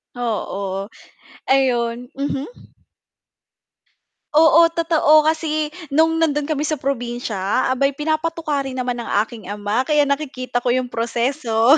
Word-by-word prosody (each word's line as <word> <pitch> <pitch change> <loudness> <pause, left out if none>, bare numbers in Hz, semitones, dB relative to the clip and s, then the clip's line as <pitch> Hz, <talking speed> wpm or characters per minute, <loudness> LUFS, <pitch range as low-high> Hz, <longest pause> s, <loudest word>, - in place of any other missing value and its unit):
Oo, 200 -4 -3 0.6
ayun. 245 -2 +1
Mhm. 280 - -5 1.6
Oo, 325 +2 +7
totoo. 320 -2 +4
Kasi 310 -1 0 0.2
nung 325 +2 +3
nando'n 295 -3 +1
kami 300 0 0
sa 305 -2 -2
probinsya, 240 -5 -1
aba'y 275 +2 +1
pinapatuka 315 +1 -1
rin 265 - -5
naman 250 -1 -2
ng 235 - -6
aking 220 -2 -7
ama, 205 +4 -1
kaya 300 -1 +3
nakikita 260 -4 -2
ko 245 - +2
yung 255 -1 -1
proseso 235 +2 +2
270 Hz, 115 wpm, -20 LUFS, 235-310 Hz, 1.6 s, Oo